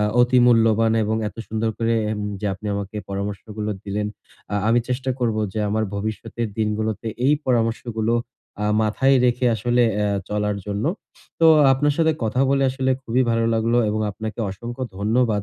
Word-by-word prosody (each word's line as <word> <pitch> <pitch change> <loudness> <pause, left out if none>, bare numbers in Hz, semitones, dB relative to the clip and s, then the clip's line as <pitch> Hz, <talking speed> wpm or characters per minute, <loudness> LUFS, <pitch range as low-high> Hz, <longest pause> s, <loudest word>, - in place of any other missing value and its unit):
আ - - +2 0.2
অতি 125 +1 +4
মূল্যবান 115 -1 +4
এবং 110 +1 0
এত - - -16
সুন্দর 110 0 -1
করে 115 0 +1 0.5
যে 105 - -2
আপনি 105 +3 -9
আমাকে 100 +1 -5
পরামর্শগুলো 105 +2 -4
দিলেন। 105 +1 -2 0.5
আ - - 0
আমি 115 +1 +4
চেষ্টা 130 +1 -1
করব 115 -3 +1 0.2
যে, 110 - -4
আমার 110 +2 0
ভবিষ্যতের 110 +2 -4
দিনগুলোতে 110 +1 -1 0.2
এই 145 - +5
পরামর্শগুলো 115 -2 0 0.5
আ - - 0 0.2
মাথায় 130 +6 +3
রেখে 125 +1 +2
আসলে 120 +3 +1 0.2
আ - - +1 0.2
চলার 105 0 -1
জন্য। 105 +1 -2 0.6
তো 165 - +6 0.3
আপনার 145 +2 +2
সাথে 160 -1 +3
কথা 110 +4 0
বলে 140 0 +2
আসলে 130 0 -1
খুবই 125 +1 +1
ভালো 115 0 +1
লাগলো 115 +2 +2
এবং 110 +1 -1
আপনাকে 110 +2 -6
অসংখ্য 120 +6 -7 0.2
ধন্যবাদ। 110 0 +1
110 Hz, 165 wpm, -22 LUFS, 105-120 Hz, 0.6 s, তো